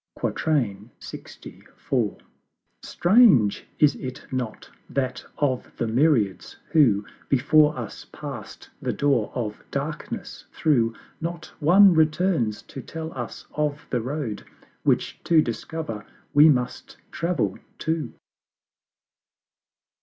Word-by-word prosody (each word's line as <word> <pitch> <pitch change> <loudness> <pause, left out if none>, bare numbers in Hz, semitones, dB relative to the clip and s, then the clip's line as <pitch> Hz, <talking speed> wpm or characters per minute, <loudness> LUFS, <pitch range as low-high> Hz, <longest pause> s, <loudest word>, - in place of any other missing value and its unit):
LXIV. 115 -9 -1 1.9
Strange, 175 - +4
is 150 -2 +5
it 130 -1 -7
not? 125 -4 -4 0.2
that 130 -2 -2
of 130 -4 -1
the - - 0
myriads 115 -4 +1
who 110 -10 +4 0.2
Before 150 +3 +4
us 115 -4 -7
pass'd - - -8
the - - -1
door 135 -7 +1
of 110 -4 -4
Darkness - - -5
through, 120 -8 +2 0.3
Not 165 -1 -5
one 185 +5 +7
returns 155 - +2
to 135 - -9
tell 160 +4 -7
us 120 -3 -6
of 150 -1 -1
the 125 - +1
Road, 130 -4 -4 0.4
Which - - 0
to 165 -2 +5
discover 120 -2 -3 0.3
we 150 +2 +8
must 125 -4 -1
travel 170 +1 -1 0.2
too. 160 -5 -2
140 Hz, 100 wpm, -25 LUFS, 115-160 Hz, 1.9 s, we